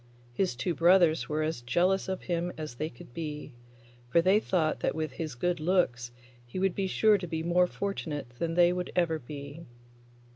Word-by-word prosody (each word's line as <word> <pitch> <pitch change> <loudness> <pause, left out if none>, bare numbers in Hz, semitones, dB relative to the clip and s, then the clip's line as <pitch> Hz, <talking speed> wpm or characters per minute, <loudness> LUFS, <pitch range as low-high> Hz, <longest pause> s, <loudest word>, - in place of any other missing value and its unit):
His 185 0 0
two 135 +8 -1
brothers 170 -1 +4
were 155 +1 0
as 155 -5 -2
jealous 180 +11 +1
of 190 - -3
him 175 0 -1
as 155 -4 -5
they 155 +6 -3
could 120 -2 -14
be, 150 -2 -6 0.6
for 170 - +4
they 190 +5 +4
thought 170 -7 0
that - - -1
with 155 -2 -2
his 155 0 -5
good 175 +6 -1
looks 155 -8 +1 0.3
he 120 +8 -9
would 190 -1 +1
be 195 -1 -1
sure 210 +2 +4
to 180 - -5
be 160 -1 -3
more 175 +1 +3
fortunate 160 -10 -4
than 165 -1 -1
they 175 0 +5
would 180 0 -3
ever 165 -3 +1
be. 145 +4 -9
165 Hz, 190 wpm, -29 LUFS, 150-180 Hz, 0.6 s, they